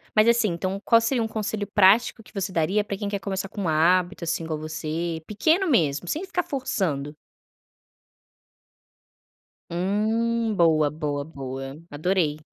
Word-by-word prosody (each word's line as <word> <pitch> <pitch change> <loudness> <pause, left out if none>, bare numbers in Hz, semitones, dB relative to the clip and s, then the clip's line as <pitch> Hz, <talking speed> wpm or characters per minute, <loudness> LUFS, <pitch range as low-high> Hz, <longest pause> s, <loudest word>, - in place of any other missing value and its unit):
mas 215 +2 +5
assim, 235 -3 +4
então 185 +3 -3
qual 230 -1 +5
seria 230 +1 +1
um 225 - 0
conselho 215 -1 -3
prático 205 +4 +4
que - - -19
você 195 -1 -3
daria 185 +5 +1
pra 200 - -4
quem 205 0 -3
quer 200 - -2
começar 195 -1 -4
com 200 -5 -4
hábito 175 +4 +2
assim 165 0 -1
igual 160 -1 -3
a 150 - -9
você, 160 +1 -3
pequeno 320 - +2
mesmo, 160 - +2
sem 315 - -2
ficar 360 -2 -1
forçando? 175 - -2 2.5
Hum, 220 +5 0
boa, 155 -4 +4
boa, 145 -2 -3
boa, 135 -2 -7
adorei, 155 0 0
190 Hz, 150 wpm, -25 LUFS, 155-220 Hz, 2.5 s, mas